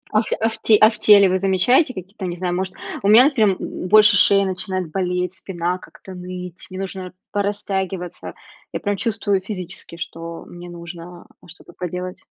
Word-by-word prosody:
А - - +6
ф - - -7
а 225 - +2
в 225 - -7
те 215 - +6
а 215 - +9
в 220 - -10
теле 205 -2 +7
вы 185 0 +1
замечаете 195 - +3
какие-то, 190 +1 -7
не 175 0 -5
знаю, 180 0 -2
может. 185 +1 -3 0.3
У 195 - -1
меня, 220 +5 +8
например, 210 -5 +3 0.3
больше 210 0 +7
шея 200 0 +5
начинает 185 -2 -3
болеть, 180 0 -1
спина 180 -1 -3
как-то 190 - -13
ныть, 180 0 -8
мне 185 0 -7
нужно 190 -1 -6 0.2
порастягиваться, 195 -3 -3 0.4
я - - -2
прям 205 -1 -1
чувствую 205 -2 -1
физически, 185 -3 -8
что 165 0 -7
мне 175 0 -11
нужно 170 0 -10 0.2
что-то 165 - -15
поделать. 180 +1 -6
185 Hz, 175 wpm, -21 LUFS, 180-200 Hz, 0.4 s, а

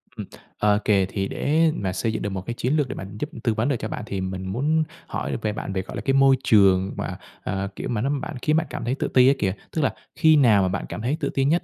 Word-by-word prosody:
Ừm, - - -6 0.3
OK, 105 0 +2 0.3
thì 95 -1 -2
để 160 +2 +2
mà 95 -2 -2
xây 115 +2 -1
dựng - - -3
được 105 - -2
một 95 -1 -4
cái 120 - -3
chiến 125 +4 -1
lược 145 -4 +1
để - - -4
mà 95 - -6
giúp 150 - -3
tư 115 - +2
vấn 110 +6 0
được 140 - +2
cho 110 - -3
bạn, - - -5
thì 100 -3 -4
mình 95 0 -4
muốn 150 +10 +1 0.2
hỏi - - -3
về 105 -1 -1
bạn 95 - -5
về, 95 - -1
gọi 100 - -9
là, - - -4
cái 135 - +1
môi 135 0 +6
trường 95 -3 +4
mà, - - -4 0.3
à, 95 0 -2
kiểu, - - -5
mà 110 -3 -1
nó 135 - 0
bạn 145 +2 -3
khiến 155 0 +2
bạn 165 0 +1
cảm - - -5
thấy 125 +3 0
tự - - -2
ti 125 0 +5
á 135 - +6
kìa. 95 -2 +1 0.2
Tức 160 - -1
là 135 - +1 0.2
khi 160 -1 +5
nào 115 -8 +5
mà 95 - +2
bạn 95 +1 -2
cảm - - -5
thấy 135 +7 -1
tự 140 - -1
ti 135 0 0
nhất? 165 +5 +2
120 Hz, 295 wpm, -24 LUFS, 100-140 Hz, 0.3 s, môi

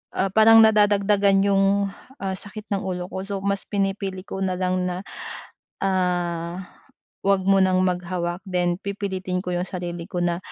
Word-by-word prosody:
ah, - - +1
parang 225 +1 +8
nadadagdagan 205 -2 +4
'yung, 200 0 +3 0.3
ah, 190 -1 -2
sakit 210 +3 -8
ng 195 - -2
ulo 180 -2 -3
ko 190 - -4
so 200 - -3
mas 200 0 -1
pinipili 195 -2 -2
ko 195 - -5
na 185 -1 0
lang 185 0 0
na, 180 0 -3 0.8
ah, 180 -2 -1 0.6
huwag 195 -1 +3
munang 190 -1 +4
maghawak 180 -1 -1
then 175 -1 0
pipilitin 190 -2 -3
ko 180 - -4
'yung 175 +1 -1
sarili 175 -2 -5
ko 180 - -3
na, 170 -1 0
190 Hz, 155 wpm, -23 LUFS, 180-200 Hz, 0.8 s, parang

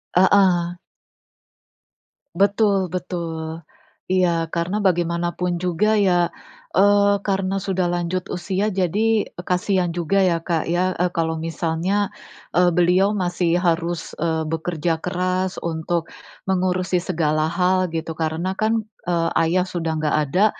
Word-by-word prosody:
Heeh. 180 -2 +4 1.6
Betul 200 -1 +2
betul. 165 -3 -4 0.4
Iya, 175 -3 +1
karena 180 +5 -1
bagaimanapun 175 -1 0
juga 205 +5 +1
ya, 175 -3 +2 0.4
eee, 200 +1 +4
karena 195 0 0
sudah 185 -2 -1
lanjut 175 +1 -1
usia 190 +4 -1
jadi 205 +4 +1 0.2
kasihan 180 -1 0
juga 175 +3 +1
ya, 170 -2 +2
Kak, 165 -1 -1
ya, 185 +1 +1
eee, 180 0 0
kalau 160 -1 -1
misalnya, 165 +5 -1 0.5
eee, 180 0 +4
beliau 180 +3 +3
masih 175 -3 0
harus, 170 -1 -1
eee, 160 -1 -1
bekerja 165 0 -1
keras, 185 +1 -1
untuk 165 0 -2 0.4
mengurusi 185 -1 0
segala 155 -3 0
hal, 185 0 +1
gitu. 160 -1 -4
Karena 165 +4 -2
kan, 220 +2 +1 0.2
eee, 170 -2 0
ayah 180 +3 +2
sudah 165 -3 -2
enggak 155 -1 0 0.2
ada, 195 +4 +4
180 Hz, 120 wpm, -22 LUFS, 170-190 Hz, 1.6 s, Heeh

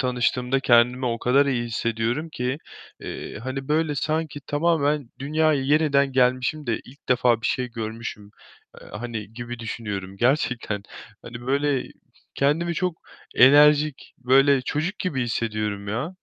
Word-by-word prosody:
tanıştığımda 125 +1 0
kendimi 125 +1 +3
o 115 -1 -1
kadar 140 +4 +3
iyi 120 -3 0
hissediyorum 115 +6 -2
ki, 130 -1 -3 0.4
eee, - - -7
hani 130 +1 -5
böyle 155 0 +1
sanki 155 +1 -2
tamamen 145 -4 +1
dünyaya 150 0 +1
yeniden 140 -1 +2
gelmişim 130 +3 +1
de 115 -2 -1
ilk 135 +4 -18
defa 125 -2 +3
bir - - 0
şey 125 -1 -1
görmüşüm, 110 -2 -6 0.5
eee, - - -13
hani, 110 -1 -6
gibi 120 +1 -7
düşünüyorum 100 -4 -5
gerçekten. 120 -4 0 0.4
Hani 120 0 -9
böyle 140 0 0 0.5
kendimi 160 +5 +1
çok 180 -1 -1 0.4
enerjik, 145 +2 +5
böyle 135 +2 +4
çocuk 155 +10 -2
gibi 145 -9 -1
hissediyorum 105 -3 -2
ya. 125 - -3
130 Hz, 135 wpm, -24 LUFS, 120-145 Hz, 0.5 s, enerjik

